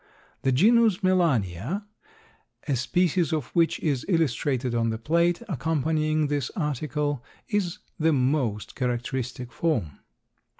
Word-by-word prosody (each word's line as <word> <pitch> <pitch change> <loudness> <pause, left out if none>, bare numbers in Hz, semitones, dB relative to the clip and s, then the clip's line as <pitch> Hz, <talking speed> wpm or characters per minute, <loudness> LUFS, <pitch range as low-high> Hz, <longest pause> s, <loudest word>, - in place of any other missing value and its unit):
The 135 - +2
genus 215 - +4
Melania, 165 - +1 0.8
a 140 - +1
species 175 +7 +1
of 155 -5 0
which 170 -1 +2
is 140 -5 0
illustrated 135 - +1
on 115 -1 +1
the 110 - -2
plate 170 - +1
accompanying 155 - 0
this 145 -3 -1
article, 145 - -2 0.3
is 200 -6 0 0.2
the 160 +1 +3
most 125 -6 0
characteristic 125 0 -3
form. 115 - -1
150 Hz, 115 wpm, -26 LUFS, 125-170 Hz, 0.8 s, genus